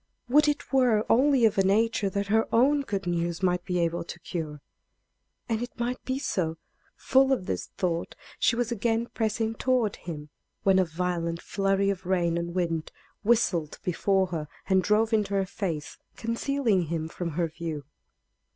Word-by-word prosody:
Would 300 +4 +5
it 295 -1 -1
were 245 -5 +4
only 265 0 +5
of 215 -2 +3
a - - +5
nature 210 +1 +2
that 200 +1 -2
her 220 +3 +2
own 280 +5 +4
good 200 -8 -3
news 170 +1 -1
might 180 -1 +2
be 180 -1 -2
able 170 0 0
to 175 - -8
cure. 155 -4 -5 0.9
And 225 -1 -1
it 245 - -6
might 245 +1 -2
be 260 0 -1
so. 165 - -1 0.4
Full 265 +1 +3
of 250 -9 +1
this 90 - -3
thought, 170 -2 -1 0.2
she - - +3
was 240 0 -1
again 230 +1 0
pressing 225 0 0
toward 240 -3 +1
him, 150 -3 -7 0.3
when 190 -1 +5
a 185 - +4
violent 170 0 -2
flurry 195 +1 +1
of 185 -2 -6
rain 175 -3 +1
and 170 +1 -3
wind 165 -3 -1 0.3
whistled 200 -9 +1
before 190 +2 +2
her 155 -2 -3 0.2
and 190 -1 +4
drove 215 +4 +2
into 205 -2 +1
her 195 -1 +2
face, 175 -7 -4 0.2
concealing 230 -4 0
him 160 0 -2
from 170 0 -5
her 170 -2 +2
view. 160 -3 -5
195 Hz, 170 wpm, -27 LUFS, 170-230 Hz, 0.9 s, Would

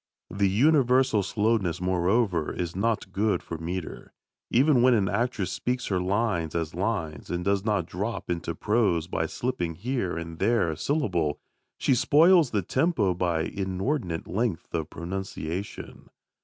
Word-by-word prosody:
The 100 +1 +1
universal 130 -1 +3
slowness, 100 -3 0
moreover, 90 -1 +1
is 85 -1 -4
not 105 -1 -1
good 105 +2 0
for 85 - -6
metre. 85 +1 -6 0.4
Even 130 +1 +4
when 125 0 +5
an 100 -4 +2
actress 110 -5 -1
speaks 125 +4 -2
her 95 -2 +1
lines 95 -4 0
as 80 -2 -2
lines, 90 -5 -3
and 90 0 -3
does 100 0 +1
not 105 -5 0
drop 100 +6 -4
into 85 -1 -3
prose 105 -6 +1
by - - -2
slipping 90 -10 -3
here 110 -3 -2
and 85 0 -6
there 115 -8 +2
a - - -4
syllable, 85 - 0 0.4
she - - +2
spoils 160 +4 +5
the 105 -4 -1
tempo 125 - +1
by 85 -2 0
inordinate 95 - -2
length 105 -5 -2
of 80 -2 -2
pronunciation. 95 +1 -6
95 Hz, 145 wpm, -26 LUFS, 85-115 Hz, 0.4 s, when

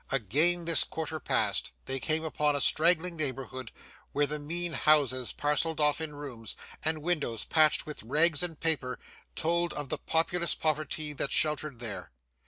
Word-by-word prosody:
Again 150 - +1
this 165 -1 +5
quarter 160 0 -5
passed, 60 - 0
they 135 - -2
came 155 +4 0
upon 150 -2 0
a - - +1
straggling 170 +4 +3
neighbourhood, 130 -4 -4 0.4
where 145 +1 +2
the 150 +1 -2
mean 170 +3 -2
houses 135 -6 +3
parcelled 150 +2 0
off 150 +1 +2
in 155 -2 -5
rooms, 125 -7 -6 0.3
and 155 -1 +1
windows 150 -10 -1
patched 155 -1 +3
with 150 - -6
rags 150 +6 +3
and 170 -4 -3
paper, 145 -6 +1 0.4
told 170 +1 0
of 145 -2 -4
the - - -2
populous 170 +1 +1
poverty 155 -1 -2
that 140 - -3
sheltered 150 -3 0
there. 110 -6 -5
150 Hz, 160 wpm, -29 LUFS, 140-160 Hz, 0.4 s, this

